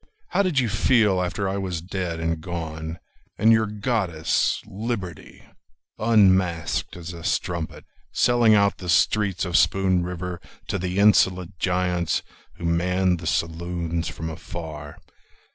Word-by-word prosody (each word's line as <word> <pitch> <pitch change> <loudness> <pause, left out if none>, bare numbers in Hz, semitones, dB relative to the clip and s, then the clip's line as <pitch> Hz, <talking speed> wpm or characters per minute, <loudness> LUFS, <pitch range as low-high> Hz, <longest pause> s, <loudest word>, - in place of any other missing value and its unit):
How - - +2
did 185 -7 0
you 125 -3 +3
feel 105 -3 +3
after 90 +2 -2
I 95 +1 -1
was 95 -4 -3
dead 90 -1 -4
and 80 -1 -2
gone, 80 -1 -5 0.4
And 110 +4 +5
your 110 -1 +4
goddess, 105 -7 0
Liberty, 100 -5 -6 0.6
unmasked 95 -8 +2
as 85 0 -7
a 85 -1 -9
strumpet, 85 -2 -2 0.3
Selling 120 +3 +4
out 100 -1 +2
the 90 - -6
streets 95 +3 +2
of 90 -1 -3
Spoon 95 -2 +3
River 90 0 -5 0.3
To 95 0 -1
the 90 +1 -3
insolent 95 -3 +3
giants 90 -2 0 0.3
Who - - -7
manned 90 +1 +1
the 80 - -6
saloons 85 0 -2
from 80 +1 -5
afar? 80 -2 -8
90 Hz, 135 wpm, -24 LUFS, 85-100 Hz, 0.6 s, And